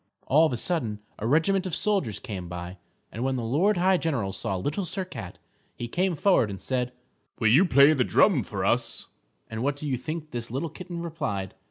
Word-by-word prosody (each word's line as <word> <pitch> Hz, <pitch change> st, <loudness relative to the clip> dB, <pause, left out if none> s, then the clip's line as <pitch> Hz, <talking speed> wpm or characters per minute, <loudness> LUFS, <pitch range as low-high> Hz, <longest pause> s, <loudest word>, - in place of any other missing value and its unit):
All 155 Hz, +4 st, +5 dB
of -, -, -4 dB
a 120 Hz, -, -1 dB
sudden, 115 Hz, -8 st, -1 dB, 0.2 s
a 110 Hz, -, -2 dB
regiment 185 Hz, +8 st, +2 dB
of 175 Hz, -, -2 dB
soldiers 195 Hz, -, 0 dB
came 95 Hz, -5 st, -6 dB
by. 90 Hz, +1 st, -7 dB, 0.3 s
And 115 Hz, -, -4 dB
when 135 Hz, 0 st, 0 dB
the 125 Hz, -, -2 dB
Lord 170 Hz, -, +2 dB
High 185 Hz, +1 st, +4 dB
General 125 Hz, -, -1 dB
saw 100 Hz, -2 st, -2 dB
Little 145 Hz, -, -2 dB
Sir 185 Hz, +1 st, -3 dB
Cat, 95 Hz, -, -8 dB, 0.4 s
he 120 Hz, -, -5 dB
came 180 Hz, +7 st, 0 dB
forward 155 Hz, -, +3 dB
and 100 Hz, -2 st, -6 dB
said, 125 Hz, +4 st, -1 dB, 0.5 s
"Will 110 Hz, -, +4 dB
you 145 Hz, -, +6 dB
play 140 Hz, -5 st, +5 dB
the 140 Hz, -, +9 dB
little 125 Hz, -, +2 dB
drum -, -, +5 dB
for -, -, -4 dB
us?" -, -, 0 dB, 0.4 s
And 110 Hz, 0 st, -5 dB
what 140 Hz, +2 st, +1 dB
do 150 Hz, -, -5 dB
you 130 Hz, -3 st, 0 dB
think 155 Hz, +4 st, -5 dB
this 120 Hz, -1 st, -4 dB
little 135 Hz, +7 st, -2 dB
kitten 170 Hz, +1 st, -7 dB
replied? 140 Hz, -, -3 dB
135 Hz, 215 wpm, -27 LUFS, 110-170 Hz, 0.5 s, the